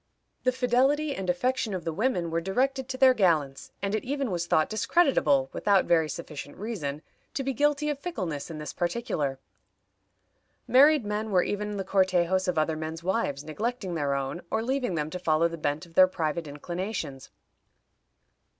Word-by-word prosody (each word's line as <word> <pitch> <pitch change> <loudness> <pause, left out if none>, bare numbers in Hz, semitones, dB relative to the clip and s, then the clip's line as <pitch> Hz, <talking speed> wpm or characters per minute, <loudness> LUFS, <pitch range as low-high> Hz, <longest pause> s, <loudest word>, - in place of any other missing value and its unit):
The 255 - +4
fidelity 265 +4 +2
and 190 -1 -4
affection 225 +3 0
of 180 - -4
the 165 -1 -3
women 180 -5 0
were 165 +1 0
directed 260 +8 0
to 260 - -3
their 260 -1 +6
gallants, 160 - +1
and 200 0 -1
it 215 - -1
even 275 -3 -2
was 170 -1 -2
thought 155 -2 +3
discreditable, 215 - +2
without 200 -2 +3
very 160 -2 +3
sufficient 150 -3 -7
reason, 165 -10 -4 0.3
to 270 - -1
be 270 0 -1
guilty 295 +3 +1
of 295 -2 -1
fickleness 185 - -4
in 160 - -6
this 150 0 -6
particular. 175 - -2 1.3
Married 280 0 +6
men 210 +1 -2
were 185 -3 +3
even 210 0 -3
the 195 - -2
cortejos 185 -1 +2
of 180 -2 0
other 155 +1 +1
men's 160 +1 -5
wives, 175 -7 -1
neglecting 200 +5 -3
their 145 -4 0
own, 140 +5 -3
or 220 0 0
leaving 255 -6 -1
them 150 0 -2
to 180 - -4
follow 165 -1 +2
the 170 - -6
bent 155 +1 -2
of 170 - -19
their 185 +2 +7
private 165 -2 -2
inclinations. 170 -1 -5
185 Hz, 175 wpm, -27 LUFS, 160-245 Hz, 1.3 s, their